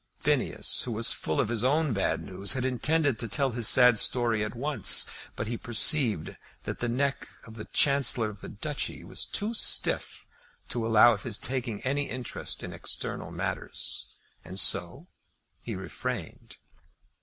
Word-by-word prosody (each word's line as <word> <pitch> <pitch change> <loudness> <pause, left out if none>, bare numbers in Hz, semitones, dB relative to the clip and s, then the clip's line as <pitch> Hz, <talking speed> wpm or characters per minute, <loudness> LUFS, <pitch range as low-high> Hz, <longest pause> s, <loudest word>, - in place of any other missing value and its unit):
Phineas, - - +2
who 120 - -2
was 115 +1 +3
full 80 - -3
of - - 0
his 115 -1 -1
own 145 +1 +1
bad 100 - -1
news, 95 +1 -1
had 130 -1 -2
intended 140 +1 0
to 115 - 0
tell 135 +4 +1
his 115 -2 +3
sad 125 -3 +7
story 120 -3 +1
at 105 +2 -6
once. 145 +4 +1 0.3
But 110 - -4
he 115 +1 -4
perceived 115 - +4 0.3
that - - -6
the 120 - -2
neck 135 +3 -2 0.2
of 115 - -13
the 110 - -8
Chancellor 135 -5 +2
of 105 -2 -10
the - - -9
Duchy 140 +6 -5
was - - -5
too 215 +3 -3
stiff 225 - 0 0.4
to 115 -2 -2
allow 115 +1 +6
of 100 - -6
his 110 -2 -2
taking 120 -4 -3
any 140 +2 -2
interest 125 0 -5
in - - -7
external - - -4
matters, - - -5 0.4
and 95 +2 -6
so 90 - +2 0.6
he - - -6
refrained. - - -7
120 Hz, 165 wpm, -27 LUFS, 110-135 Hz, 0.6 s, sad